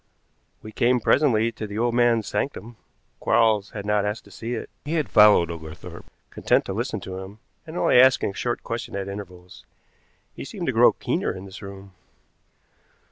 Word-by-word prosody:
We 110 Hz, -, -9 dB
came 125 Hz, +3 st, +2 dB
presently 115 Hz, -3 st, +2 dB
to 110 Hz, -1 st, -7 dB
the 100 Hz, +1 st, -7 dB
old 120 Hz, +1 st, +1 dB
man's 120 Hz, -3 st, +2 dB
sanctum. 115 Hz, +1 st, -4 dB, 0.4 s
Quarles 110 Hz, -3 st, +2 dB
had 100 Hz, -2 st, -7 dB
not 105 Hz, -1 st, +1 dB
asked 105 Hz, +1 st, -3 dB
to -, -, -18 dB
see 120 Hz, +2 st, -5 dB
it. 110 Hz, -, -6 dB, 0.2 s
He 150 Hz, -, -4 dB
had 155 Hz, -3 st, 0 dB
followed 105 Hz, -5 st, +6 dB
Oglethorpe, 80 Hz, -2 st, -10 dB, 0.2 s
content -, -, +1 dB
to 95 Hz, -, -4 dB
listen 115 Hz, +1 st, -3 dB
to 95 Hz, +1 st, -7 dB
him, 95 Hz, +2 st, -10 dB, 0.3 s
and 160 Hz, +2 st, -7 dB
only -, -, +4 dB
asking 130 Hz, -5 st, +5 dB
a -, -, -14 dB
short 120 Hz, +4 st, -3 dB
question 115 Hz, -3 st, -5 dB
at 100 Hz, -1 st, -3 dB
intervals. 90 Hz, -3 st, -9 dB, 0.7 s
He -, -, -8 dB
seemed -, -, -6 dB
to -, -, 0 dB
grow -, -, +6 dB
keener -, -, -2 dB
in 95 Hz, +1 st, -8 dB
this 95 Hz, +1 st, -11 dB
room. 100 Hz, -1 st, -10 dB
105 Hz, 185 wpm, -24 LUFS, 100-120 Hz, 0.7 s, followed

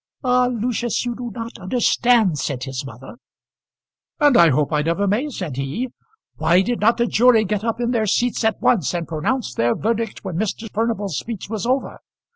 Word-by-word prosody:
"Ah! 250 Hz, -1 st, +3 dB
Lucius, 240 Hz, 0 st, -1 dB
you 240 Hz, -, -2 dB
do 240 Hz, 0 st, -6 dB
not 230 Hz, +1 st, -7 dB
understand," 230 Hz, -, +2 dB
said 130 Hz, -1 st, -3 dB
his 135 Hz, -1 st, -4 dB
mother. 135 Hz, -, -11 dB, 1.0 s
"And 290 Hz, -3 st, +5 dB
I 170 Hz, -4 st, +7 dB
hope 150 Hz, +2 st, +1 dB
I 150 Hz, -, +2 dB
never 170 Hz, +6 st, 0 dB
may," 220 Hz, +10 st, 0 dB
said 180 Hz, -, -5 dB
he. 140 Hz, -, -3 dB, 0.5 s
"Why 180 Hz, +3 st, +3 dB
did 240 Hz, +3 st, -2 dB
not 225 Hz, +3 st, +3 dB
the 235 Hz, -, +2 dB
jury 235 Hz, -1 st, +4 dB
get 210 Hz, +1 st, -2 dB
up 230 Hz, 0 st, -2 dB
in 240 Hz, 0 st, 0 dB
their 225 Hz, -3 st, 0 dB
seats 240 Hz, +4 st, +1 dB
at 220 Hz, 0 st, +1 dB
once 180 Hz, -, +2 dB
and 170 Hz, -1 st, -3 dB
pronounce 165 Hz, -, -2 dB
their 120 Hz, -1 st, +1 dB
verdict 225 Hz, 0 st, -2 dB
when 185 Hz, -4 st, -4 dB
Mr. 220 Hz, +3 st, -2 dB
Furnival's 210 Hz, -6 st, -1 dB
speech 225 Hz, -3 st, -7 dB
was 220 Hz, +1 st, -3 dB
over? 260 Hz, +2 st, -1 dB
220 Hz, 190 wpm, -21 LUFS, 170-240 Hz, 1.0 s, I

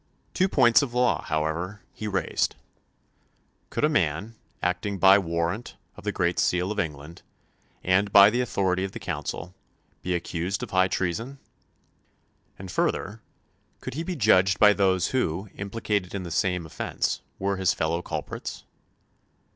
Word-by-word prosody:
Two 185 Hz, 0 st, +2 dB
points 120 Hz, -5 st, +5 dB
of 125 Hz, -4 st, -4 dB
law, 125 Hz, -1 st, +2 dB
however, 85 Hz, +6 st, -2 dB
he 110 Hz, -, -6 dB
raised: 95 Hz, -4 st, 0 dB, 1.1 s
Could -, -, -3 dB
a -, -, +6 dB
man, 95 Hz, -, 0 dB, 0.3 s
acting 90 Hz, +3 st, -1 dB
by 95 Hz, +1 st, +7 dB
warrant 85 Hz, +5 st, -2 dB, 0.2 s
of -, -, -12 dB
the -, -, 0 dB
great 85 Hz, -1 st, 0 dB
seal 90 Hz, +2 st, +1 dB
of 105 Hz, -, -3 dB
England, 75 Hz, -1 st, -5 dB, 0.6 s
and 95 Hz, +2 st, +2 dB
by 100 Hz, +1 st, +8 dB
the 120 Hz, +2 st, +1 dB
authority 95 Hz, -6 st, 0 dB
of 95 Hz, -, -4 dB
the -, -, -6 dB
Council, 90 Hz, +2 st, -5 dB, 0.5 s
be 90 Hz, 0 st, -1 dB
accused 85 Hz, +5 st, -3 dB
of 115 Hz, -, -6 dB
high 95 Hz, 0 st, +4 dB
treason? 110 Hz, +10 st, -2 dB, 1.2 s
And 95 Hz, -1 st, -8 dB
further, 105 Hz, +5 st, -1 dB, 0.6 s
could -, -, -6 dB
he 155 Hz, -, -3 dB
be 180 Hz, +2 st, -3 dB
judged 95 Hz, -, +4 dB
by 105 Hz, 0 st, +7 dB
those 95 Hz, -3 st, +2 dB
who, 100 Hz, -6 st, -1 dB
implicated 100 Hz, -2 st, -3 dB
in 95 Hz, -, -3 dB
the 85 Hz, -, -7 dB
same 90 Hz, 0 st, 0 dB
offence, 80 Hz, -, -2 dB, 0.2 s
were 100 Hz, 0 st, -1 dB
his 95 Hz, -2 st, +2 dB
fellow 80 Hz, +2 st, -1 dB
culprits? -, -, -6 dB
95 Hz, 150 wpm, -26 LUFS, 90-105 Hz, 1.2 s, by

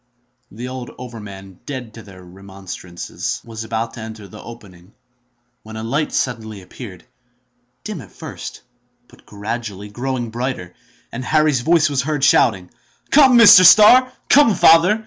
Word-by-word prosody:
The 120 Hz, +5 st, -8 dB
old 130 Hz, -1 st, -8 dB
overman, 100 Hz, -6 st, -11 dB
dead 130 Hz, -5 st, -7 dB
to 115 Hz, -, -11 dB
their 95 Hz, -3 st, -15 dB
remonstrances, 90 Hz, -8 st, -8 dB
was 115 Hz, -1 st, -8 dB
about 115 Hz, +1 st, -4 dB
to -, -, -11 dB
enter 110 Hz, -2 st, -10 dB
the 105 Hz, +1 st, -13 dB
opening, 100 Hz, -5 st, -15 dB, 0.7 s
when 110 Hz, 0 st, -12 dB
a 110 Hz, -, -6 dB
light 140 Hz, +5 st, -1 dB
appeared, 110 Hz, -4 st, -10 dB, 0.8 s
dim 210 Hz, -8 st, -7 dB
at 100 Hz, -6 st, -15 dB
first, -, -, -10 dB, 0.4 s
but -, -, -23 dB
gradually 105 Hz, -1 st, -7 dB
growing 120 Hz, +1 st, -5 dB
brighter, 120 Hz, -7 st, -5 dB, 0.4 s
and 120 Hz, +2 st, -6 dB
Harry's 155 Hz, -1 st, +1 dB
voice 160 Hz, +2 st, +2 dB
was 140 Hz, -3 st, -1 dB
heard 145 Hz, 0 st, -3 dB
shouting, 105 Hz, -9 st, +2 dB, 0.4 s
"Come, 270 Hz, -4 st, +6 dB
Mr. 205 Hz, -5 st, +8 dB
Starr! 245 Hz, +7 st, +7 dB, 0.2 s
come, 275 Hz, -8 st, +4 dB
father! 170 Hz, +7 st, +4 dB
115 Hz, 140 wpm, -18 LUFS, 100-145 Hz, 0.8 s, Mr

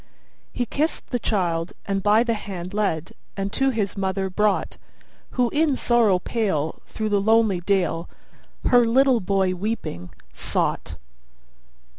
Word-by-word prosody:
He 245 Hz, -, -2 dB
kissed 300 Hz, +7 st, -2 dB
the 245 Hz, -, 0 dB
child, 175 Hz, -6 st, -1 dB
and 195 Hz, -1 st, -1 dB
by 210 Hz, +3 st, +4 dB
the 235 Hz, -1 st, 0 dB
hand 185 Hz, -4 st, -6 dB
led, 195 Hz, -7 st, -1 dB, 0.3 s
And 195 Hz, +1 st, -3 dB
to 270 Hz, 0 st, +2 dB
his 215 Hz, -6 st, -1 dB
mother 190 Hz, -1 st, -1 dB
brought, 210 Hz, +1 st, 0 dB, 0.6 s
Who 245 Hz, -2 st, +2 dB
in 295 Hz, -2 st, +2 dB
sorrow 235 Hz, -7 st, +3 dB
pale, 180 Hz, -7 st, -2 dB
through 215 Hz, -1 st, -3 dB
the 205 Hz, -1 st, +2 dB
lonely 220 Hz, -3 st, +3 dB
dale, 175 Hz, -3 st, 0 dB, 0.6 s
Her 245 Hz, -2 st, +5 dB
little 260 Hz, +1 st, +4 dB
boy 190 Hz, -1 st, +1 dB
weeping 180 Hz, -, -4 dB, 0.2 s
sought. -, -, -1 dB
205 Hz, 135 wpm, -23 LUFS, 185-230 Hz, 0.6 s, Her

